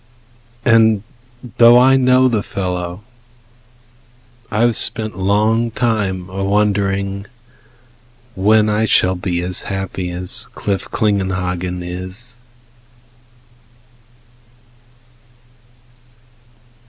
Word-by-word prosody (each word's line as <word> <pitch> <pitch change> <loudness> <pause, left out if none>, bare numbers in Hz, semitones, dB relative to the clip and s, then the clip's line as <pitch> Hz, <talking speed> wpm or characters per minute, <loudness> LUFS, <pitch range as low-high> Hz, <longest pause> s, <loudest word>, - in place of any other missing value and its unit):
And 110 -3 +3 0.6
though 120 0 +7
I 130 +2 +5
know 130 0 +4
the 115 -4 0
fellow, 90 -1 -5 1.5
I 110 0 -1
have 120 -1 +2
spent 110 -3 +3
Long 105 +5 +1
time 100 -6 -2
a 95 +1 -5
wondering 100 -1 -1 1.1
when 105 +2 +3
I 105 +1 +1
shall 95 -3 +2
be 90 -1 -3
As 90 +1 +2
happy 95 -2 -4
as 90 +1 0
Cliff 100 -2 -3
Klingenhagen 90 -4 -2
is. 95 +7 -8
100 Hz, 80 wpm, -17 LUFS, 95-110 Hz, 1.5 s, though